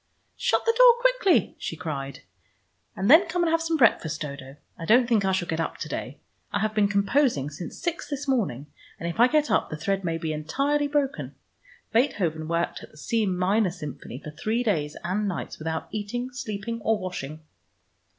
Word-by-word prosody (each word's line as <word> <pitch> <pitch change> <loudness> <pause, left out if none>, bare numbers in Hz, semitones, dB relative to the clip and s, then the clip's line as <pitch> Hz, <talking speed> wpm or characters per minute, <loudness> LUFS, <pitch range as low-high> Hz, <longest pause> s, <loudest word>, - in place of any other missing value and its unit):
"Shut - - +1
the 460 - +4
door - - +8
quickly!" 480 - +3
she - - -4
cried. 140 -5 -5 0.7
"And 190 - -1
then 325 - +8
come 345 +2 0
and 330 - +2
have 330 0 +2
some 330 0 0
breakfast, 170 - +3
Dodo. 140 -2 -7 0.2
I - - -9
don't 235 +7 +5
think 225 -4 +3
I 190 - +2
shall 185 -2 0
get 160 - -2
up 165 - -2
to - - -5
day. - - -5 0.3
I - - 0
have 215 0 0
been 210 -1 +3
composing 200 - +1
since 165 +4 -7
six 345 0 -3
this 285 -1 -4
morning, 190 - 0 0.3
and 170 - -3
if 170 +6 -5
I 240 - +8
get 300 +2 +2
up - - +2
the 155 - -5
thread 195 +5 -1
may 165 -2 -1
be 160 -1 -3
entirely 275 - 0
broken. 285 -1 -1 0.6
Beethoven 175 - +1
worked 170 +1 -1
at - - -11
the - - -20
C 220 +7 0
minor 190 +3 +2
Symphony 150 -8 -7
for 150 +2 -8
three 220 +10 -1
days 155 -10 -1
and 200 +4 -1
nights 185 - -4
without 160 +1 -3
eating, 230 +5 -4
sleeping, 230 -1 -5
or 220 +1 +2
washing." 160 -5 -6
200 Hz, 195 wpm, -26 LUFS, 160-260 Hz, 0.7 s, door